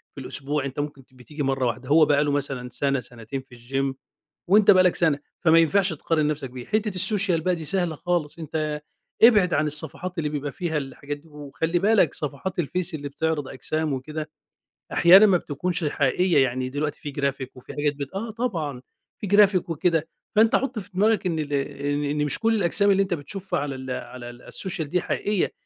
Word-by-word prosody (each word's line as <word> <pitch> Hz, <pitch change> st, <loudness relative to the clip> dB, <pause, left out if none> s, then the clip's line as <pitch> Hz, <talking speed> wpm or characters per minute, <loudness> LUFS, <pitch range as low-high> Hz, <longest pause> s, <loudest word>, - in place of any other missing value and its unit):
في 140 Hz, -, -7 dB
الأسبوع، 140 Hz, +2 st, -3 dB
أنت 135 Hz, +1 st, -5 dB
ممكن 145 Hz, -2 st, -4 dB
بتيجي 135 Hz, +4 st, -7 dB
مَرّة 135 Hz, -1 st, 0 dB
واحدة، 125 Hz, +3 st, -4 dB
هو 155 Hz, +1 st, +6 dB
بقى 145 Hz, 0 st, +3 dB
له 145 Hz, -, 0 dB
مثلًا 135 Hz, -3 st, -2 dB
سنة 140 Hz, +1 st, 0 dB
سنتين 120 Hz, +2 st, -7 dB
في 130 Hz, -2 st, -17 dB
الGym 135 Hz, +3 st, -2 dB, 0.5 s
وأنت 205 Hz, +1 st, +7 dB
بقى 185 Hz, -2 st, +6 dB
لك 180 Hz, -, +3 dB
سنة، 155 Hz, -4 st, +2 dB, 0.2 s
فما 165 Hz, 0 st, +5 dB
ينفعش 185 Hz, +3 st, +3 dB
تقارن 155 Hz, 0 st, 0 dB
نفسك 150 Hz, -3 st, -3 dB
بيه، 125 Hz, -1 st, -9 dB
حِتّة 215 Hz, 0 st, 0 dB
الSocial 185 Hz, -3 st, +3 dB
بقى 180 Hz, +2 st, +1 dB
دي 160 Hz, -2 st, -7 dB
سهلة 175 Hz, 0 st, 0 dB
خالص، 170 Hz, -1 st, -2 dB
أنت 155 Hz, -1 st, -3 dB, 0.4 s
ابعد 210 Hz, -6 st, +6 dB
عن 150 Hz, +1 st, +2 dB
الصفحات 160 Hz, +5 st, -4 dB
اللي 155 Hz, -2 st, -1 dB
بيبقى 145 Hz, -1 st, -3 dB
فيها 170 Hz, -4 st, -2 dB
الحاجات 140 Hz, +1 st, -5 dB
دي، 150 Hz, +3 st, -20 dB
وخلِّ 150 Hz, +3 st, -2 dB
بالك 195 Hz, -4 st, +3 dB
صفحات 150 Hz, +5 st, -4 dB
الفيس 180 Hz, +3 st, -2 dB
اللي 145 Hz, -2 st, -6 dB
بتعرض 150 Hz, 0 st, -2 dB
أجسام 155 Hz, +2 st, -2 dB
وكده، 150 Hz, +4 st, -5 dB, 0.6 s
أحيانًا 185 Hz, +5 st, +8 dB
ما 190 Hz, -4 st, +5 dB
بتكونش 170 Hz, +3 st, -2 dB
حقيقية، 150 Hz, +2 st, +2 dB
يعني 130 Hz, 0 st, -2 dB
دلوقتي 145 Hz, +2 st, -3 dB
في 145 Hz, -, -6 dB
Graphic 140 Hz, -2 st, -2 dB
وفيه 125 Hz, -, -11 dB
حاجات 145 Hz, 0 st, 0 dB
بت 140 Hz, +3 st, -7 dB
آه، 220 Hz, +3 st, -3 dB
طبعًا 170 Hz, -, -3 dB, 0.4 s
في 205 Hz, -, -4 dB
Graphic 200 Hz, -2 st, +4 dB
وكده، 165 Hz, 0 st, +1 dB, 0.3 s
فأنت 225 Hz, +1 st, +5 dB
حُط 265 Hz, -3 st, -1 dB
في 200 Hz, -, -9 dB
دماغك 210 Hz, +2 st, +2 dB
إن 165 Hz, -3 st, -1 dB
ال 145 Hz, -1 st, -3 dB
إن 145 Hz, +1 st, -1 dB
إن 150 Hz, +1 st, 0 dB
مش 145 Hz, -, +1 dB
كُلّ 225 Hz, 0 st, +2 dB
الأجسام 200 Hz, +1 st, +2 dB
اللي 195 Hz, 0 st, +4 dB
أنت 190 Hz, -, -2 dB
بتشوفها 180 Hz, +6 st, -4 dB
على 140 Hz, -2 st, -3 dB
ال 130 Hz, 0 st, -6 dB
على 125 Hz, -1 st, -6 dB
ال 120 Hz, 0 st, -13 dB
الSocial 190 Hz, -2 st, -3 dB
دي 170 Hz, +4 st, -1 dB
حقيقية، 205 Hz, +1 st, -1 dB
150 Hz, 195 wpm, -24 LUFS, 140-180 Hz, 0.6 s, أحيانًا